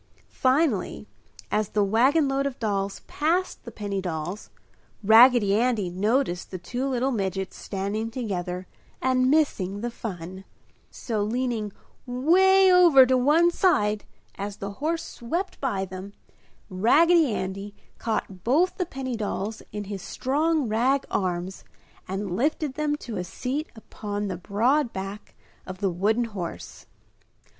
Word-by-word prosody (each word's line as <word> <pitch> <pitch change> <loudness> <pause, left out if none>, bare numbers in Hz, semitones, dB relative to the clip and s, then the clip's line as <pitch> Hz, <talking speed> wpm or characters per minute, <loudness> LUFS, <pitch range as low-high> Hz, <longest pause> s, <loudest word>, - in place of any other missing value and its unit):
Finally, 260 - +1 0.5
as 210 -1 0
the 210 - +1
wagon 260 +9 +3
load 275 +1 0
of 270 - -6
dolls 200 -3 -2
passed 345 +5 -1
the - - -7
penny 200 -2 -3
dolls, 175 +2 -5 0.5
Raggedy 225 -1 +7
Andy 220 -4 +1
noticed 205 0 0
the 185 - -5
two 245 +9 -3
little 260 0 0
midgets 195 -4 -2
standing 205 +3 -3
together 185 -7 -4 0.3
and 255 0 +2
missing 205 -10 +1
the 240 +1 -3
fun; 190 -4 -7 0.5
so, 220 -4 -3
leaning 225 -1 -1 0.4
'way 370 +9 +5
over 335 -8 +8
to 260 +1 +2
one 300 +7 +4
side 210 - +2 0.3
as 200 0 -4
the 200 0 -5
horse 320 +9 -2
swept 340 +11 -4
by 200 -9 -1
them, 190 +2 -9 0.5
Raggedy 295 - +4
Andy 195 +2 -5 0.2
caught 195 -5 -3
both 315 +10 +2
the 365 - -1
penny 265 -5 -4
dolls 215 0 -3
in 210 0 -4
his 200 -1 -6
strong 300 - 0
rag 250 +6 +2
arms 180 0 -2 0.4
and 190 -1 -3
lifted 290 - 0
them 300 0 -1
to 235 -7 -7
a 180 - -2
seat 255 - -4
upon 205 -2 -5
the 185 - -3
broad 235 - +1
back 195 +2 -7 0.3
of 185 0 -6
the 195 -1 0
wooden 215 +7 +1
horse. 195 -7 -7
220 Hz, 135 wpm, -25 LUFS, 195-270 Hz, 0.5 s, over